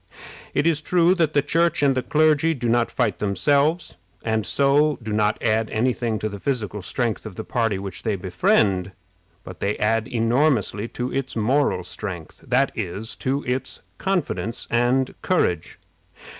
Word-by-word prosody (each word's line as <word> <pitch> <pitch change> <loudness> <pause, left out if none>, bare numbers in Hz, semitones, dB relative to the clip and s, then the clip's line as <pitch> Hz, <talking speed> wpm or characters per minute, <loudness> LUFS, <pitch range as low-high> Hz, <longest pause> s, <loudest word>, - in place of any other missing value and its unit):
It - - +2
is 160 -2 +2
true 175 +2 +3
that 165 -5 +1
the 145 - +3
Church 170 -1 +1
and 140 -1 +4
the 130 - 0
clergy 155 +2 +2
do 120 -3 -3
not 120 0 +2
fight - - -1
themselves, 145 - +1 0.3
and 110 -4 -1
so 145 +4 +3
do 110 -1 -4
not 105 0 +1
add 110 -1 +1
any 125 +4 +1
thing 115 -3 -2
to 110 - -2
the 100 -1 -7
physical 105 -5 -2
strength 115 +4 -2
of 110 -4 -8
the - - -5
party 115 -5 0
which 95 -1 -6
they 110 -3 -1
befriend, 95 +1 +1 0.5
but 95 -3 -10
they 100 +1 -1
add 110 +1 +1
enormously 115 -3 +1
to 125 +1 -4
its 135 -1 -3
moral 115 -3 +1
strength, 90 -2 -7
that - - +2
is, 105 +6 -4
to 135 +2 -1
its 125 +2 -3 0.2
confidence 175 - -2
and 125 +2 +2
courage. 90 - 0
120 Hz, 165 wpm, -23 LUFS, 105-145 Hz, 0.5 s, and